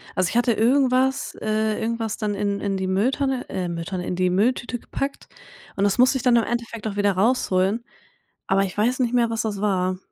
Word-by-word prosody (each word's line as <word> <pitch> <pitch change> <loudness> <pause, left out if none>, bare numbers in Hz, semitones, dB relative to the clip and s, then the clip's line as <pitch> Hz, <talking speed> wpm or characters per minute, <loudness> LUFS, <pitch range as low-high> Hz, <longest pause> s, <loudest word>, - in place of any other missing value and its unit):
Also, 185 -1 +2
ich - - -6
hatte 240 0 +3
irgendwas 260 +3 +2
äh, 215 0 0
irgendwas 225 -1 -2
dann 210 -2 -2
in 200 0 -1
in 200 -1 -2
die 190 0 -2
Mülltonne 255 +7 0
äh, 180 -2 -3
Mülltonne 170 +2 -4
in 180 - -2
die 185 0 +2
Mülltüte 240 +5 0
gepackt 275 +4 -5 0.5
und 195 - +1
das 200 - +1
musste 255 +2 +4
ich 255 - -6
dann 250 -2 +4
im 230 - +4
Endeffekt 230 -2 -4
auch 200 - -4
wieder 205 -1 +2
rausholen, 200 0 +1 0.6
aber 195 +1 +2
ich 185 - -6
weiß 245 +5 +1
nicht 245 -1 +1
mehr, 235 -2 +3
was 225 +1 -1
das 210 -3 -3
war. 185 -3 0
220 Hz, 210 wpm, -23 LUFS, 195-245 Hz, 0.6 s, musste